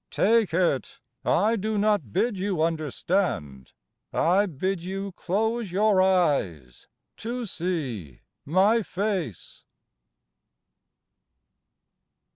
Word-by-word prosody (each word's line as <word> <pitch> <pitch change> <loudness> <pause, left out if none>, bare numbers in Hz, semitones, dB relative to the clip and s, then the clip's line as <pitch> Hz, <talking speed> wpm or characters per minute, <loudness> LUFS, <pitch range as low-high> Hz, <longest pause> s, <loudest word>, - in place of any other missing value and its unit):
Take 220 -2 +2
it; 170 -5 0 0.2
I 215 +5 +2
do 215 0 -2
not 205 - +1
bid 220 - 0
you 185 -4 0
understand; 155 - -2 0.4
I 190 +5 +3
bid 185 +3 -2
you 195 +2 -4
close 215 +4 -1
your 200 0 +3
eyes 140 - 0 0.3
â - - -13
^to 245 -1 -3
see 135 - -4 0.2
my 190 - +3
face! 190 - -4
185 Hz, 90 wpm, -26 LUFS, 155-205 Hz, 0.4 s, I